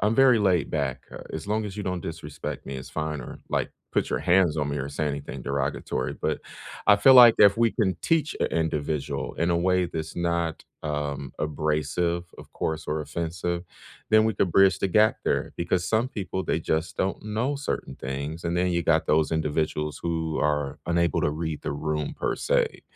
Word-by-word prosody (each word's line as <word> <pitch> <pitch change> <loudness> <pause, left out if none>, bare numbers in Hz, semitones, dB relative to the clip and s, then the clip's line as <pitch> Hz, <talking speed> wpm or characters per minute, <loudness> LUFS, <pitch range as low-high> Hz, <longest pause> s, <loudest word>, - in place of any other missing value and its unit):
I'm 105 +2 +2
very 130 -3 +6
laid 95 -5 +2
back, 65 -1 -2
uh, - - -9
as 80 +3 -5
long 110 +1 0
as 100 0 -6
you 105 - -3
don't 90 -2 -2
disrespect 80 -3 -6
me, 70 0 -5
it's 65 - -8
fine, 75 -2 -3
or, - - -9
like, - - -1 0.2
put - - 0
your - - +1
hands 90 -3 +3
on 75 - 0
me 70 - -2
or 70 0 -3
say 75 +2 -2
anything 70 -2 -4
derogatory, 65 -1 -2
but, - - 0 0.5
I 105 - +8
feel 130 +6 +7
like 120 -3 +10
if 100 0 +7
we 115 -1 +3
can 95 -7 0
teach 160 -2 +1
a - - +3
individual 75 -2 -2
in 85 +2 0
a 85 - +2
way 90 +1 +2
that's 80 -1 -5
not, 85 -2 -1 0.2
um, 75 -3 -3
abrasive- 75 +3 -1
of - - -13
course- 80 0 -3
or 75 +1 -1
offensive, 85 +3 -3 0.5
then 110 0 +6
we 110 - +1
could 95 -1 +1
bridge 95 -2 +5
the - - +1
gap 110 +4 +4
there, - - 0
because 90 +1 0
some 110 +4 +2
people, 95 -5 -4
they 80 - 0
just 80 0 -1
don't 95 - -1
know 115 +7 -1
certain 140 - -4
things, 70 +5 -5
and 85 +1 -1
then 90 +1 +2
you 85 -1 0
got 80 -1 +2
those 75 +1 +2
individuals 75 -1 -1
who 80 -2 -1
are 75 -2 0
unable 85 0 +1
to - - +2
read 80 0 -4
the - - -2
room, 75 0 -2
per - - -2
se. - - 0
85 Hz, 200 wpm, -26 LUFS, 75-95 Hz, 0.5 s, like